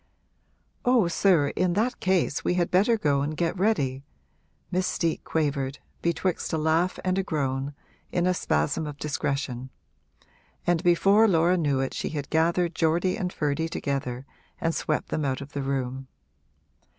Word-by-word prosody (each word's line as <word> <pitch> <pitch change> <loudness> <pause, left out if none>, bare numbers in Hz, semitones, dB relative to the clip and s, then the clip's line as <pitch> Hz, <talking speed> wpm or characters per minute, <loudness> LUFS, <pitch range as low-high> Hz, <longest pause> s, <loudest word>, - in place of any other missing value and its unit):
'Oh 245 -7 +4
sir, 170 -5 +3
in 180 -1 0
that 225 +6 0
case 185 -6 +1
we 180 - +1
had 175 -1 0
better 210 +6 +4
go 145 -8 +1
and 150 +2 -2
get 170 +1 0
ready!' 145 -10 0 0.7
Miss 185 0 +1
Steet 165 -2 -1
quavered, 140 -3 -1 0.2
betwixt 170 +1 -1
a - - +2
laugh 160 +4 +1
and 185 +1 +1
a - - +1
groan, 140 -4 -2 0.4
in 175 -1 +1
a 185 - +3
spasm 80 - 0
of 145 -1 -7
discretion; 140 -3 -2 1.0
and 175 -2 +2
before 195 +5 +5
Laura 175 -1 +3
knew 145 -6 +1
it 135 - -2
she - - -3
had 145 -3 -5
gathered 170 +2 +2
Geordie 170 +3 +1
and 185 -5 -2
Ferdy 150 +1 -1
together 135 -4 -3 0.3
and 165 - 0
swept 155 - -1
them 155 - -1
out 135 -2 -1
of 140 0 -9
the 140 - -2
room. 135 -1 -3
160 Hz, 160 wpm, -26 LUFS, 140-180 Hz, 1.0 s, before